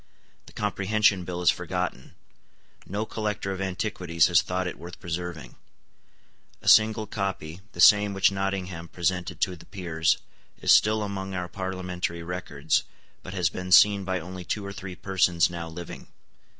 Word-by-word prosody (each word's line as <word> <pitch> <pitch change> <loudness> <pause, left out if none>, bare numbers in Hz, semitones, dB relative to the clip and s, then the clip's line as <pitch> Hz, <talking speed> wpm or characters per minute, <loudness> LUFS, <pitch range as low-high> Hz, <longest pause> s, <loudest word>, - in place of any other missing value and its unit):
The - - -15
Comprehension 105 -2 +1
Bill 90 0 -4
is - - +6
forgotten. 90 0 -4 0.7
No 105 +4 -2
collector 105 -3 -3
of 95 0 -4
antiquities 90 -4 0
has - - +5
thought 90 +1 -2
it 90 - -5
worth 85 +1 -10
preserving. 85 -2 -5 1.0
A - - -13
single 110 0 +6
copy, 95 -5 -4
the - - -12
same 105 -1 +7
which 95 0 +4
Nottingham 95 -3 -3
presented 90 +1 -2
to 90 - +1
the 80 - -16
peers, 85 -4 0 0.4
is - - +2
still 110 0 +5
among 95 -1 -4
our 90 -1 -3
parliamentary 90 -2 -4
records, 85 -4 -1 0.4
but 90 - -8
has 90 -2 +2
been 90 0 -6
seen 100 +1 +7
by 95 -1 -1
only 90 +2 -8
two 100 +3 -3
or 100 - -6
three 95 -2 -7
persons 90 -3 +2
now 85 -1 -5
living. 85 +1 -8
90 Hz, 155 wpm, -26 LUFS, 90-100 Hz, 1.0 s, same